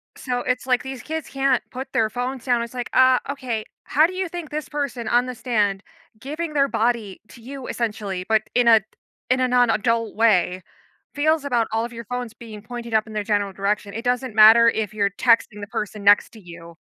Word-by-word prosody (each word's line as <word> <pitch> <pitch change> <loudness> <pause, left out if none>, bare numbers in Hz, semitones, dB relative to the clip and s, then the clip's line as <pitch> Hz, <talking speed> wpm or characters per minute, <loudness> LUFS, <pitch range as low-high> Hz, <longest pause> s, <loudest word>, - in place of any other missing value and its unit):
So, 250 -2 -3
it's 250 0 -2
like, 250 -1 +1
these 265 -3 -7
kids 320 -1 -5
can't 270 -2 +1
put 265 +1 -7
their 220 -1 +2
phones 250 +2 -4
down. 245 -2 +2
It's 235 - -8
like, 245 -1 -4
uh, 260 0 +5
okay 250 -6 -4 0.3
how 305 +3 +5
do 355 - -3
you 375 0 -2
think 340 -2 -7
this 305 0 -4
person 270 -6 -4
on 245 +1 +2
the 255 - -4
stand, 210 -6 0 0.4
giving 305 +6 -5
their 275 -1 +3
body 225 -6 -1
to 235 - -15
you 265 +2 -8
essentially, 210 -5 -3
but 220 -1 +3
in 245 -1 +2
a 225 -2 +7 0.5
in 255 +1 +2
a 255 - +2
non-adult 230 -2 +1
way, 185 -5 +2 0.5
feels 310 +1 +1
about 240 -5 +1
all 225 +1 0
of 240 - -9
your 230 0 -7
phones 245 0 -5
being 225 -2 -11
pointed 235 +1 -8
up 220 0 +2
in 220 - -10
their 210 -1 -2
general 205 -2 -1
direction. 200 +1 -2
It 225 - -5
doesn't 245 -2 -1
matter 225 +2 +8
if 220 -2 0
you're 200 -2 +1
texting 225 -1 +2
the 200 - -6
person 210 0 -5
next 205 +1 +5
to 220 - -13
you. 170 -2 -12
235 Hz, 215 wpm, -22 LUFS, 215-255 Hz, 0.5 s, matter